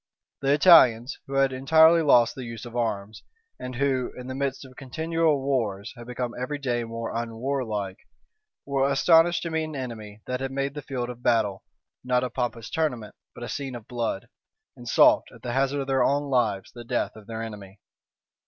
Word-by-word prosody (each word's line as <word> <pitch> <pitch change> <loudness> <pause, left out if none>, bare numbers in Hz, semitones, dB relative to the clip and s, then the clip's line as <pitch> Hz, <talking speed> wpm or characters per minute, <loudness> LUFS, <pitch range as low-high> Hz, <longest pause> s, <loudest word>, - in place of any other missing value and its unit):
The 140 0 +3
Italians, 130 -7 +6
who 135 - -7
had 135 -1 +3
entirely 160 +5 +5
lost 120 -6 +5
the 130 - -7
use 115 -2 -7
of 120 0 -10
arms, 110 -3 -2 0.4
and 125 0 -6
who, 130 -1 0
in 125 - -8
the 130 - -5
midst 135 0 -3
of 130 -1 -15
continual 160 +2 0
wars, 110 -7 -1
had 120 -1 -11
become 125 -1 -4
every 145 +3 -3
day 125 -4 -1
more 115 0 -5
unwarlike, 115 -4 -3 0.7
were 140 -1 +1
astonished 165 +5 +4
to 170 - -4
meet 160 0 0
an 155 -1 -7
enemy 110 -5 -7
that 125 +1 -3
made 140 +1 -2
the 145 - -6
field 125 -3 -4
of 120 0 -12
battle, 110 -5 +1 0.4
not 125 0 +1
a 125 - -3
pompous 120 -3 -3
tournament, 125 -10 -2 0.2
but 120 - -8
a - - -4
scene 135 -3 -5
of 115 -2 -10
blood, 115 -5 -3 0.5
and 120 - -12
sought, - - +5
at - - -17
the 120 - -3
hazard 135 +2 +1
of - - -3
their 135 -1 +2
own 140 0 0
lives, 110 -7 0
the 120 - -10
death 115 - -2
of 105 -2 -14
their 115 -1 -5
enemy. 105 -3 -9
125 Hz, 190 wpm, -26 LUFS, 115-140 Hz, 0.7 s, Italians